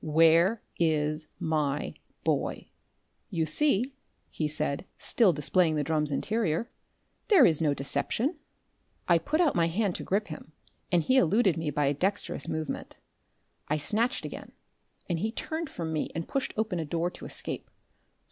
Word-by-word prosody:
"Where 165 Hz, +7 st, +4 dB, 0.2 s
is 155 Hz, -1 st, +1 dB
my 150 Hz, -3 st, -1 dB, 0.3 s
boy?" -, -, -1 dB, 0.6 s
"You 165 Hz, -6 st, 0 dB
see," 255 Hz, -, +2 dB, 0.4 s
he 155 Hz, -, -1 dB
said, 150 Hz, +1 st, -1 dB
still 225 Hz, -6 st, +3 dB
displaying 160 Hz, +2 st, +2 dB
the 150 Hz, -, 0 dB
drum's 150 Hz, 0 st, +1 dB
interior, 210 Hz, -, -1 dB, 0.6 s
"there 375 Hz, -, +7 dB
is 160 Hz, -1 st, +3 dB
no 150 Hz, -3 st, +2 dB
deception 235 Hz, -, -1 dB, 0.4 s
" -, -, -42 dB
I 170 Hz, -1 st, +5 dB
put 305 Hz, -, -1 dB
out 335 Hz, -5 st, +4 dB
my 170 Hz, -1 st, +2 dB
hand 195 Hz, +3 st, 0 dB
to -, -, -6 dB
grip 205 Hz, +1 st, 0 dB
him, 155 Hz, 0 st, -9 dB, 0.4 s
and 175 Hz, -3 st, +3 dB
he 260 Hz, +8 st, +3 dB
eluded 195 Hz, -2 st, +4 dB
me 160 Hz, -2 st, -2 dB
by 150 Hz, -1 st, 0 dB
a 140 Hz, -, +2 dB
dexterous 190 Hz, -1 st, -1 dB
movement. 155 Hz, -1 st, -4 dB, 0.7 s
I 150 Hz, -, +1 dB
snatched 220 Hz, -, 0 dB
again, -, -, -8 dB, 0.5 s
and 170 Hz, -3 st, -1 dB
he 220 Hz, +5 st, -1 dB
turned 320 Hz, +5 st, -4 dB
from 165 Hz, -8 st, -4 dB
me 155 Hz, -, -1 dB
and 165 Hz, 0 st, -3 dB
pushed 275 Hz, -, -2 dB
open 215 Hz, -5 st, 0 dB
a 160 Hz, -, -2 dB
door 170 Hz, +3 st, -1 dB
to -, -, -10 dB
escape. -, -, -5 dB
165 Hz, 160 wpm, -28 LUFS, 155-215 Hz, 0.7 s, there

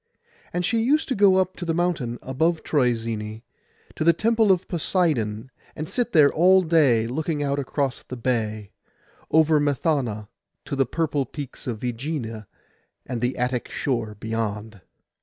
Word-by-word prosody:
And 175 Hz, 0 st, -1 dB
she 230 Hz, +2 st, +1 dB
used 295 Hz, +7 st, +2 dB
to 260 Hz, -, 0 dB
go 195 Hz, -2 st, +5 dB
up 185 Hz, 0 st, +1 dB
to -, -, -6 dB
the 165 Hz, -2 st, -1 dB
mountain 165 Hz, -9 st, -1 dB
above 160 Hz, +5 st, 0 dB
Troezene, 115 Hz, -5 st, -1 dB, 0.5 s
to -, -, -2 dB
the 170 Hz, +1 st, +5 dB
temple 220 Hz, +3 st, +3 dB
of 185 Hz, -2 st, +1 dB
Poseidon 135 Hz, -, 0 dB, 0.2 s
and 155 Hz, -, -5 dB
sit 240 Hz, +4 st, -1 dB
there 150 Hz, -3 st, +5 dB
all 185 Hz, +3 st, +5 dB
day 145 Hz, -9 st, +3 dB
looking 145 Hz, +5 st, -2 dB
out 140 Hz, 0 st, 0 dB
across 140 Hz, -1 st, -2 dB
the 130 Hz, -, -8 dB
bay, 110 Hz, -4 st, -2 dB, 0.6 s
over 160 Hz, -1 st, +4 dB
Methana, 140 Hz, -7 st, 0 dB, 0.4 s
to 140 Hz, -, -3 dB
the 135 Hz, -1 st, +1 dB
purple 145 Hz, -4 st, -1 dB
peaks 140 Hz, -4 st, -8 dB
of 115 Hz, -4 st, -4 dB
Ægina 120 Hz, -3 st, -4 dB, 0.6 s
and 120 Hz, -2 st, -4 dB
the 125 Hz, +1 st, -1 dB
Attic 125 Hz, 0 st, -1 dB
shore 115 Hz, -6 st, -2 dB
beyond. 110 Hz, -2 st, -4 dB
140 Hz, 155 wpm, -24 LUFS, 115-165 Hz, 0.6 s, go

